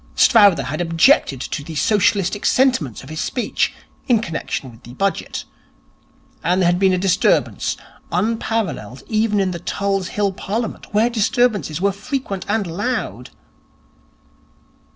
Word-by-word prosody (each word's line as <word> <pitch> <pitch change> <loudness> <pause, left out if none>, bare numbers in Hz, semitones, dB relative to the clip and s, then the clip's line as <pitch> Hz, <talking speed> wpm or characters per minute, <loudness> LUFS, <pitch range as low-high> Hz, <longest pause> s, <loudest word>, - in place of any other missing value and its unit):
Strowther 205 - +6
had 155 +6 -3
objected 165 - +3
to 145 - -4
the 160 +2 -8
socialistic 205 +2 +1
sentiments 250 - +2
of - - -12
his 155 - -3
speech 245 - -1 0.4
in 245 - +5
connection 160 - -4
with 115 +1 -17
the 120 +2 -12
Budget, 195 +5 -2 1.0
and 180 +1 +2
there 185 - +3
had 175 +1 +2
been 190 -1 +4
a 185 - +2
disturbance 190 +1 +1 0.3
unparalleled 205 - -2
even 215 -1 +1
in 190 -2 +1
the 170 - -5
Tulse 195 +1 -1
Hill 205 0 0
Parliament, 215 +4 -4
where 215 +3 +3
disturbances 220 -7 +1
were 200 +1 +3
frequent 200 -1 -4
and 210 -1 +1
loud.... 200 +9 -3
195 Hz, 135 wpm, -20 LUFS, 170-220 Hz, 1.0 s, Strowther